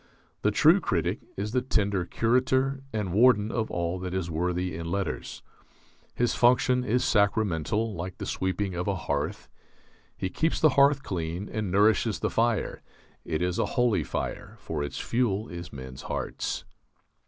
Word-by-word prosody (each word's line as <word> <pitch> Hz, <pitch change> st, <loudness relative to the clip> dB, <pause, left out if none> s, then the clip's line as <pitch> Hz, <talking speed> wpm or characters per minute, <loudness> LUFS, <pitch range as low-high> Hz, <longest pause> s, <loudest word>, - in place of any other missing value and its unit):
The -, -, +3 dB
true -, -, +5 dB
critic -, -, 0 dB, 0.2 s
is 105 Hz, +2 st, -2 dB
the 125 Hz, +1 st, +1 dB
tender 100 Hz, -7 st, 0 dB
curator 130 Hz, +5 st, +1 dB
and 105 Hz, -5 st, -2 dB
warden 110 Hz, -1 st, +5 dB
of 110 Hz, -2 st, -1 dB
all 85 Hz, +1 st, -2 dB
that 90 Hz, 0 st, -4 dB
is 90 Hz, -3 st, -2 dB
worthy 90 Hz, +2 st, -1 dB
in 85 Hz, 0 st, -5 dB
letters. 100 Hz, -1 st, -3 dB, 0.7 s
His 120 Hz, -1 st, +1 dB
function 125 Hz, +1 st, +3 dB
is 125 Hz, +1 st, +1 dB
sacramental, 105 Hz, 0 st, +1 dB
like 90 Hz, 0 st, -6 dB
the -, -, -5 dB
sweeping 95 Hz, +1 st, -2 dB
of 90 Hz, +2 st, -3 dB
a 100 Hz, -, +1 dB
hearth. 70 Hz, -4 st, -3 dB, 0.7 s
He 95 Hz, -, -3 dB
keeps 160 Hz, +1 st, 0 dB
the 155 Hz, -, +6 dB
hearth 140 Hz, 0 st, +4 dB
clean 85 Hz, +2 st, -3 dB
and 105 Hz, -3 st, -3 dB
nourishes 105 Hz, +2 st, +3 dB
the -, -, -1 dB
fire. 115 Hz, -1 st, 0 dB, 0.4 s
It 80 Hz, +2 st, -1 dB
is 90 Hz, 0 st, -1 dB
a -, -, +2 dB
holy 120 Hz, -9 st, +3 dB
fire, 65 Hz, -, -4 dB
for 75 Hz, -2 st, -4 dB
its 70 Hz, -, -5 dB
fuel 115 Hz, -3 st, 0 dB
is 85 Hz, -2 st, -7 dB
men's 65 Hz, -1 st, -8 dB
hearts. -, -, -3 dB
100 Hz, 160 wpm, -27 LUFS, 90-120 Hz, 0.7 s, the